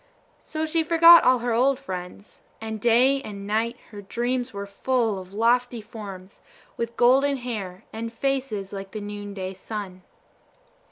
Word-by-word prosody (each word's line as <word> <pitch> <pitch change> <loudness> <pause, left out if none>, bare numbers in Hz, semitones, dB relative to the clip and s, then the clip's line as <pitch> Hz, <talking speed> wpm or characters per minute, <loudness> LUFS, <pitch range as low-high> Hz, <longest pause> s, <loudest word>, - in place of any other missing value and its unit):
So 315 0 -3
she 320 +1 +1
forgot 335 +1 +8
all 255 0 +5
her 240 - +1
old 260 +3 +2
friends, 185 -4 -8 0.2
and 220 -1 -6
day 250 +4 +4
and 200 -6 -8
night 225 +3 -1
her 205 -2 -8
dreams 245 +5 -2
were 200 -1 -5
full 225 0 -1
of 185 0 -11
lofty 240 +3 +1
forms 205 -4 -10 0.3
with 235 0 -4
golden 270 +3 +4
hair 210 -7 -6
and 225 +1 -5
faces 235 -6 -2
like 195 -1 -7
the 215 - -4
noonday 205 -2 -6
sun. 190 -1 -7
225 Hz, 150 wpm, -25 LUFS, 200-255 Hz, 0.3 s, forgot